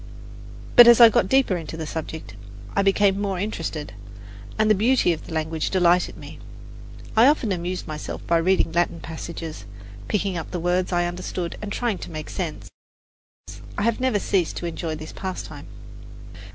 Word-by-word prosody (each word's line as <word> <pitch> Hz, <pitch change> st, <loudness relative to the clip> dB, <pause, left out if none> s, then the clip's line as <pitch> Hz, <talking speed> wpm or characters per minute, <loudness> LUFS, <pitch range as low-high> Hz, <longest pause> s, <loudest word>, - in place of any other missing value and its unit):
But 240 Hz, -1 st, +10 dB
as 235 Hz, 0 st, +8 dB
I 235 Hz, -1 st, +10 dB
got 190 Hz, -3 st, +1 dB
deeper 265 Hz, -8 st, +3 dB
into 165 Hz, -2 st, -6 dB
the 160 Hz, -, -4 dB
subject, 160 Hz, -7 st, -6 dB, 0.4 s
I -, -, +3 dB
became 195 Hz, 0 st, +2 dB
more 195 Hz, -2 st, -1 dB
interested, 165 Hz, -, -4 dB, 0.6 s
and 215 Hz, -, +3 dB
the 215 Hz, -, +6 dB
beauty 220 Hz, -2 st, +3 dB
of 160 Hz, -, -9 dB
the -, -, -10 dB
language 160 Hz, 0 st, -2 dB
delighted 180 Hz, -1 st, +2 dB
me. -, -, -11 dB, 0.8 s
I 225 Hz, +3 st, +7 dB
often 275 Hz, -7 st, +2 dB
amused 180 Hz, 0 st, -3 dB
myself 155 Hz, -2 st, -6 dB
by 170 Hz, -, +3 dB
reading 170 Hz, 0 st, +2 dB
Latin 170 Hz, 0 st, 0 dB
passages, 160 Hz, -4 st, -7 dB, 0.4 s
picking 195 Hz, -3 st, -1 dB
up 165 Hz, -, -6 dB
words 180 Hz, +2 st, 0 dB
I 175 Hz, -1 st, +1 dB
understood 175 Hz, 0 st, -4 dB
and 210 Hz, -1 st, -5 dB
trying 230 Hz, -3 st, -1 dB
to -, -, -8 dB
make 155 Hz, -2 st, -7 dB
sense. 165 Hz, -5 st, -5 dB, 1.1 s
I 205 Hz, -, 0 dB
have 230 Hz, 0 st, +1 dB
never 255 Hz, -4 st, +1 dB
ceased 190 Hz, -4 st, 0 dB
to -, -, -4 dB
enjoy 165 Hz, -1 st, -4 dB
this 155 Hz, 0 st, -8 dB
pastime. 190 Hz, -1 st, -6 dB
180 Hz, 165 wpm, -23 LUFS, 165-205 Hz, 1.1 s, But